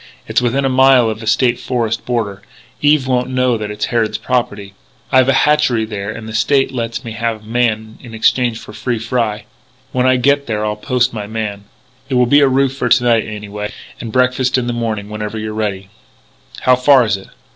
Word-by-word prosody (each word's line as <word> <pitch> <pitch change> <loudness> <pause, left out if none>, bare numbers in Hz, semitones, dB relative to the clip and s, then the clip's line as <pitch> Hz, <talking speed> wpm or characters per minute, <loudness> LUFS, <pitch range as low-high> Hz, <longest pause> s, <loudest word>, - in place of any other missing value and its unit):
It's - - +1
within 130 +3 0
a - - +3
mile 130 -3 +4
of 110 - -6
the 110 - -8
State 120 +1 +2
Forest 115 -3 -2
border. 105 -5 -2 0.4
Eve 145 -2 +3
won't 125 -1 0
know 125 -1 +1
that 105 -2 -4
it's 105 0 -2
Harrod 115 -2 +1
property. 105 -6 -2 0.4
I've 130 0 +4
a - - +4
hatchery 150 -7 +2
there 105 -2 -5
and 110 0 -7
the 110 - -7
State 135 +5 +2
lets 115 -3 -4
me 115 - -5
have 110 -1 -3
a - - -16
man 110 -2 -1
in 115 -3 -10
exchange 120 +1 +2
for 105 - -11
free 120 +2 -2
fry. 115 -2 -2 0.5
When 130 0 +1
I 130 - +4
get 140 +3 +2
there 105 -2 -1
I'll 105 0 -1
post 125 +3 0
my 105 -2 -5
man.... 105 -2 -4 0.4
It 130 - -1
will 125 0 +4
be 145 +4 +5
a 140 - +5
roof 135 0 +1
for 125 -2 -1
to 120 +1 +4
night, 115 -2 +2
anyway, 105 -1 -6 0.3
and 115 - -6
breakfast 125 +1 +2
in 125 - -1
the 120 - -2
morning, 110 -3 -3
whenever 105 +1 -5
you're 110 0 -4
ready." 100 -3 -3 0.7
"How 130 - +5
far 130 0 +5
is 105 -2 +1
it?" 95 - -10
115 Hz, 210 wpm, -16 LUFS, 110-130 Hz, 0.7 s, be